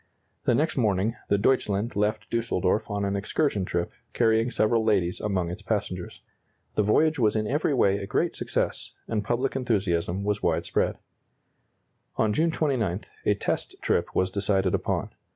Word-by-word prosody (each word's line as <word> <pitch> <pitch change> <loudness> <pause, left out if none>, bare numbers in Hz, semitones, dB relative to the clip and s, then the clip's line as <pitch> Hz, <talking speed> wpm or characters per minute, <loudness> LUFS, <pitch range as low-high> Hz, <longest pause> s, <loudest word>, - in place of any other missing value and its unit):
The 120 - +3
next 155 +4 0
morning 105 -2 +1
the 100 - +4
"Deutschland" 105 -1 +1
left 105 +1 -1
Düsseldorf 110 -3 0
on 100 -1 -1
an 100 0 -1
excursion 100 0 0
trip, 85 -1 -2 0.2
carrying 110 +1 +3
several 115 -1 +2
ladies 95 -5 +1
among 95 -5 -1
its 90 - -7
passengers. - - -3 0.5
The - - +2
voyage 155 +9 +3
was 110 -3 +3
in 110 0 +1
every 145 +4 +1
way 100 -5 +3
a 100 -1 -5
great - - 0
success, - - -2
and 105 -2 -1
public 125 +6 -1
enthusiasm 100 -7 0
was 105 0 -1
widespread. - - 0 1.2
On 110 -1 +2
June 165 +8 +2
29, 120 - 0 0.3
a - - +4
test - - -2
trip - - 0
was 95 0 +2
decided 95 -2 +1
upon. - - -1
105 Hz, 155 wpm, -26 LUFS, 100-115 Hz, 1.2 s, the